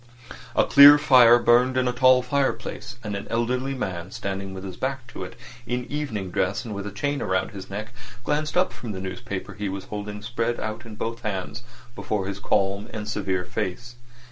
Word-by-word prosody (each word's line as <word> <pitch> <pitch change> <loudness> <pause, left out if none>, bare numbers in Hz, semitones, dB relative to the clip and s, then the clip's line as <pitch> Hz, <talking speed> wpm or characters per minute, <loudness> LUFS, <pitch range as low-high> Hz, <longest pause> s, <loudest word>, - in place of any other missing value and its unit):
A - - +5
clear 145 +1 +9
fire 130 -5 +7
burned 125 +2 +4
in 130 -1 +2
a 125 - 0
tall 130 0 +5
fireplace, 135 0 -2
and 105 -2 -3
an 100 - -6
elderly 125 +4 -1
man 90 -7 -4
standing 95 0 -4
with 95 0 -7
his 95 -2 -6
back 130 +1 -3
to - - -7
it, - - -8 0.3
in 125 0 -2
evening 115 -11 -3
dress 95 +7 -1
and 110 - -5
with 100 0 -5
a - - -5
chain 140 +7 -2
round 95 0 0
his 95 -2 -9
neck, 110 +4 -6 0.3
glanced 150 +4 -1
up 185 +1 +2
from 115 -4 -6
the 95 - -5
newspaper 95 +1 -5
he 100 0 -3
was 95 0 -5
holding 105 0 -6
spread 120 +1 -2
out 110 +2 -5
in 110 - -9
both 115 +2 -4
hands 105 0 -4 0.3
before 100 -2 -2
his 100 +1 -4
calm 100 0 0
and 105 -1 -5
severe 95 -4 -1
face. 120 +8 -4
110 Hz, 195 wpm, -24 LUFS, 100-125 Hz, 0.3 s, clear